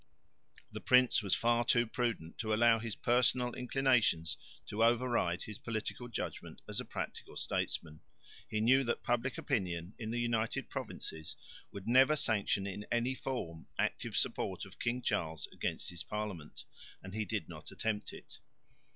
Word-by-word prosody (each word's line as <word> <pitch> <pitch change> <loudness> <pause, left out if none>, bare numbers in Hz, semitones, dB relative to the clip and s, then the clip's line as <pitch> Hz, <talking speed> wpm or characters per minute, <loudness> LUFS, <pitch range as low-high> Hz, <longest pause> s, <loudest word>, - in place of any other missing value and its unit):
The - - -6
prince 125 -1 +5
was 100 -3 +2
far 120 0 +3
too 120 0 +4
prudent 115 -9 -2
to 110 -2 +1
allow 115 0 +5
his 115 -2 -4
personal 125 0 +3
inclinations 125 -10 +2 0.3
to 110 +2 0
override 115 -7 +2
his 105 -2 -8
political 115 +2 -3
judgment 120 - -5
as - - -1
a - - -3
practical - - -5
statesman. 75 -2 -2 0.5
He 110 - 0
knew 130 +4 +5
that 120 - -1
public 120 +1 0
opinion 90 - -1
in 110 -2 -4
the 120 +1 -1
United 115 -1 0
Provinces 80 -1 -5 0.4
would 100 -1 -8
never 130 +5 +6
sanction 105 -7 +1
in 100 +1 -4
any 120 +2 +2
form 85 -12 -4
active - - -1
support - - -1
of - - -14
King 120 +1 -1
Charles 80 - -1
against - - -2
his 85 -2 -5
parliament, 105 -8 -5 0.4
and 95 0 -8
he 110 0 0
did 100 - -2
not - - -9
attempt 110 -1 -2
it. - - -12
115 Hz, 155 wpm, -34 LUFS, 100-120 Hz, 0.5 s, never